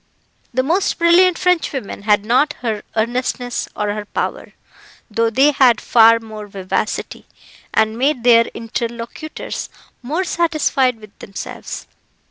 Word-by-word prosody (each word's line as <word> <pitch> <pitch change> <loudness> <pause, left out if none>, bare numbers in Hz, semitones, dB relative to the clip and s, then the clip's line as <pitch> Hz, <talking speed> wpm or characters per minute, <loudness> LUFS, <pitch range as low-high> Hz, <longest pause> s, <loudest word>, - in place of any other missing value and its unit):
The 255 0 0
most 345 +8 0
brilliant 345 +1 +5
Frenchwomen 290 - -1
had 210 -1 +3
not 270 +6 +3
her 220 -4 -2
earnestness 245 +2 -2
or 210 0 -1
her 210 0 -5
power, - - -4 0.6
though 230 +2 +1
they 270 +6 +4
had 255 -5 +4
far 230 0 +5
more 215 -2 -9
vivacity, 195 +2 -3 0.4
and 220 +1 +1
made 270 -2 +1
their 230 -1 +6
interlocutors 235 +5 -5 0.3
more 305 +9 -2
satisfied 310 -8 +1
with 215 -2 -16
themselves. 195 - -7
240 Hz, 120 wpm, -19 LUFS, 220-290 Hz, 0.6 s, their